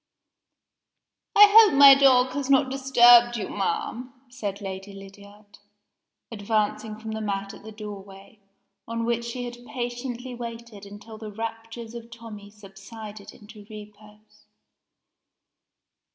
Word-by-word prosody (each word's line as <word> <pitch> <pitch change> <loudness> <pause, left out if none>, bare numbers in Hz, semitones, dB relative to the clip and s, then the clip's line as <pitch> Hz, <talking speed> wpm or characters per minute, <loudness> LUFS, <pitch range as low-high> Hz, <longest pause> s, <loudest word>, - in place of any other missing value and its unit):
"I 415 - +10
hope 415 -7 +6
my 280 -1 +10
dog 260 -2 +4
has 280 -1 -4
not 270 -1 +3
disturbed 240 -3 +5
you, 215 - -5
ma'am?" 230 +6 -4 0.2
said 210 -6 -6
Lady 195 0 -8
Lydiard, 200 +1 -15 0.7
advancing 215 0 -3
from 220 0 -8
the 220 0 -5
mat 200 -1 -4
at - - -13
the 220 - -10
doorway, 200 -1 -11 0.5
on 230 0 -4
which 235 0 -1
she 245 +1 -6
had 240 0 -10
patiently 245 0 -6
waited 230 -3 -9
until 210 +2 -12
the 215 -1 -8
raptures 225 +1 -8
of 235 -1 -10
Tommie 225 -4 -12
subsided 205 +1 -12
into 210 0 -15
repose. 210 0 -15
225 Hz, 125 wpm, -24 LUFS, 205-240 Hz, 0.7 s, I